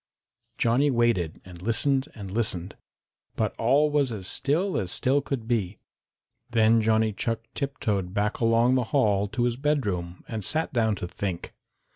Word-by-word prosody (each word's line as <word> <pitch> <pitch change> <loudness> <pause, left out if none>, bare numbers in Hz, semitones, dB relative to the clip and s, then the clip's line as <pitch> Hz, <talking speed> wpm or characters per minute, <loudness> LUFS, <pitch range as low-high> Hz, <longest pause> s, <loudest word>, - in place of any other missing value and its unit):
Johnny 125 +5 +3
waited 120 - +1
and 90 -2 -12
listened 130 +6 +1
and 100 -3 -8
listened, 95 -5 -2 0.6
but - - 0
all 140 +6 +3
was 145 -4 +2
as 100 -5 -5
still 165 - +1
as 90 -5 -1
still 135 +3 +2
could 130 -5 -4
be. 110 -5 -1 0.7
Then 115 -1 +4
Johnny 110 0 +2
Chuck 115 +2 -2
tiptoed 105 -10 -2
back 105 +2 -1
along 115 +2 +3
the 130 -2 +2
hall 105 -6 +2
to 120 +4 -2
his 120 -1 0
bedroom 105 - -1
and 110 -3 -4
sat 160 - -1
down 110 -3 +2
to 90 - -5
think. 90 -1 -5
115 Hz, 155 wpm, -26 LUFS, 100-130 Hz, 0.7 s, Then